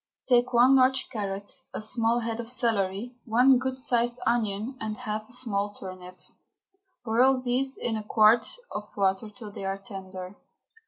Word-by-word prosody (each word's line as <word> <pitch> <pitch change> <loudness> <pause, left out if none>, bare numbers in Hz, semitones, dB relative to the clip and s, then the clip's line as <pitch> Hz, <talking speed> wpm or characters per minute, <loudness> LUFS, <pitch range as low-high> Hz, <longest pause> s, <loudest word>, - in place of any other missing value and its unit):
Take 245 0 +3
one 250 +2 +6
large 260 0 +3
carrot, 200 +2 -4
a - - -2
small 230 +2 +2
head 225 0 -3
of 230 -1 -5
celery, 225 -2 -1
one 250 +3 +5
good 260 0 -3
sized 240 -2 0
onion, 225 +1 0
and 215 -1 -4
half 215 +1 -5
a - - -15
small 205 -5 -2
turnip, 185 -1 -9
and - - -32 0.7
boil 255 +4 +3
these 255 +2 -1
in 230 - -2
a 215 - -4
quart 215 +2 +4 0.2
of 210 0 -6
water 195 +2 +1
till 210 -1 -10
they 200 - -8
are 195 0 -2
tender. 190 -1 -8
225 Hz, 165 wpm, -27 LUFS, 200-245 Hz, 0.7 s, one